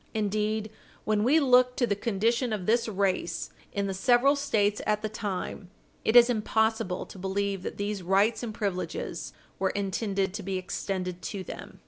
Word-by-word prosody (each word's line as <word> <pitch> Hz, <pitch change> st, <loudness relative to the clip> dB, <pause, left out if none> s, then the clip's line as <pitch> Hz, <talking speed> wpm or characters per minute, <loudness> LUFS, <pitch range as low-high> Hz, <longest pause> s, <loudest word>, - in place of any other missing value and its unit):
Indeed, 215 Hz, 0 st, -1 dB, 0.3 s
when 210 Hz, -1 st, +2 dB
we 285 Hz, +7 st, +5 dB
look 250 Hz, -3 st, +4 dB
to 245 Hz, -, +2 dB
the 205 Hz, -, 0 dB
condition 230 Hz, +4 st, 0 dB
of 205 Hz, -4 st, -2 dB
this 230 Hz, +3 st, +2 dB
race 190 Hz, -5 st, -1 dB, 0.2 s
in 200 Hz, 0 st, -1 dB
the 195 Hz, -, -2 dB
several 245 Hz, +7 st, +4 dB
States 210 Hz, -8 st, +1 dB
at 210 Hz, 0 st, +1 dB
the 215 Hz, -, -1 dB
time, 200 Hz, -2 st, -4 dB, 0.3 s
it 220 Hz, -, +1 dB
is 240 Hz, -1 st, +9 dB
impossible 220 Hz, -4 st, 0 dB
to 190 Hz, -, -12 dB
believe 195 Hz, +1 st, -1 dB
that -, -, -6 dB
these 205 Hz, -1 st, -2 dB
rights 195 Hz, +5 st, +2 dB
and 235 Hz, -3 st, -4 dB
privileges 200 Hz, -4 st, -3 dB, 0.3 s
were 190 Hz, -, +2 dB
intended 195 Hz, -1 st, -1 dB
to -, -, -4 dB
be 190 Hz, 0 st, -2 dB
extended 185 Hz, -1 st, -3 dB
to 190 Hz, +3 st, -5 dB
them. -, -, -9 dB
210 Hz, 170 wpm, -28 LUFS, 195-225 Hz, 0.3 s, is